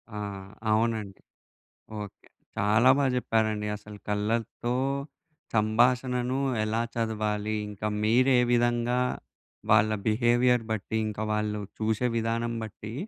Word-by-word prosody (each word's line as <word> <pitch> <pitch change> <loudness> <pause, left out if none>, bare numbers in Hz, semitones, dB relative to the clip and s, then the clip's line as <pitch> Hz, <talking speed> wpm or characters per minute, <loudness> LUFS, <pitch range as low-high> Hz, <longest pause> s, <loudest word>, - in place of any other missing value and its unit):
ఆ! - - -4 0.5
అవునండి. 110 -3 0 0.8
ఓకే. 100 -2 -10 0.3
చాలా 110 +5 +4
బా 140 - +2
జెప్పారండి. 110 -4 0
అసలు 105 0 -12
కళ్ళతో 110 +3 -1 0.8
సంభాషణను 125 +4 +2 0.2
ఎలా 110 +2 0
చదవాలి, 110 -2 -1
ఇంక 105 -1 -10 0.2
మీరే 125 +4 +4
విధంగా 120 0 +2 0.7
వాళ్ళ 110 0 +5 0.2
బిహేవియర్ 120 +2 +3
బట్టి, 110 +1 -2
ఇంక 105 -1 -5
వాళ్ళు 105 0 -1 0.2
చూసే 110 +2 +1
విధానం 115 +1 -1
బట్టీ, 110 0 -8
110 Hz, 100 wpm, -27 LUFS, 105-120 Hz, 0.8 s, వాళ్ళ